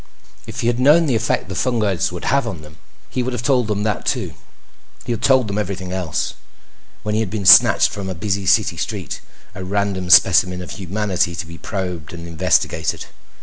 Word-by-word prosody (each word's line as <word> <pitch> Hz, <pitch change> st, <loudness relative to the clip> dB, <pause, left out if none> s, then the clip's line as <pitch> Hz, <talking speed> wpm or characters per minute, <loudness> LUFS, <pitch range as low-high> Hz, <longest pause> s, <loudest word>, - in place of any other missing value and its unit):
If -, -, -6 dB
he -, -, -3 dB
had 120 Hz, 0 st, 0 dB
known 150 Hz, +6 st, +5 dB
the 140 Hz, -, 0 dB
effect 115 Hz, -2 st, -1 dB
the 95 Hz, -, -6 dB
fungoids 105 Hz, -6 st, 0 dB
would 90 Hz, -, -7 dB
have 140 Hz, -2 st, +1 dB
on 90 Hz, -8 st, -6 dB
them, 75 Hz, 0 st, -14 dB, 0.3 s
he 130 Hz, -, -1 dB
would 125 Hz, +1 st, -3 dB
have 120 Hz, -1 st, -4 dB
told 125 Hz, -4 st, +2 dB
them 105 Hz, -1 st, -2 dB
that 105 Hz, -2 st, -2 dB
too. -, -, -2 dB, 0.7 s
He 120 Hz, -, -3 dB
had 115 Hz, -1 st, -3 dB
told 130 Hz, -4 st, +3 dB
them 100 Hz, +1 st, -2 dB
everything 95 Hz, -2 st, -4 dB
else, 90 Hz, -4 st, -2 dB, 0.7 s
when 105 Hz, -1 st, -2 dB
he 110 Hz, -, +1 dB
had 110 Hz, -, -2 dB
been 105 Hz, -1 st, -4 dB
snatched -, -, +7 dB
from 100 Hz, -2 st, -6 dB
a 95 Hz, -, -4 dB
busy 95 Hz, +2 st, -2 dB
city -, -, +2 dB
street, -, -, -5 dB, 0.3 s
a 95 Hz, -, -7 dB
random 95 Hz, -1 st, -2 dB
specimen 90 Hz, +1 st, +5 dB
of -, -, -9 dB
humanity 95 Hz, -2 st, -2 dB
to 85 Hz, +2 st, -5 dB
be 85 Hz, 0 st, -11 dB
probed 90 Hz, -7 st, -5 dB
and 85 Hz, -1 st, -8 dB
investigated. 85 Hz, -2 st, 0 dB
100 Hz, 200 wpm, -19 LUFS, 90-110 Hz, 0.7 s, snatched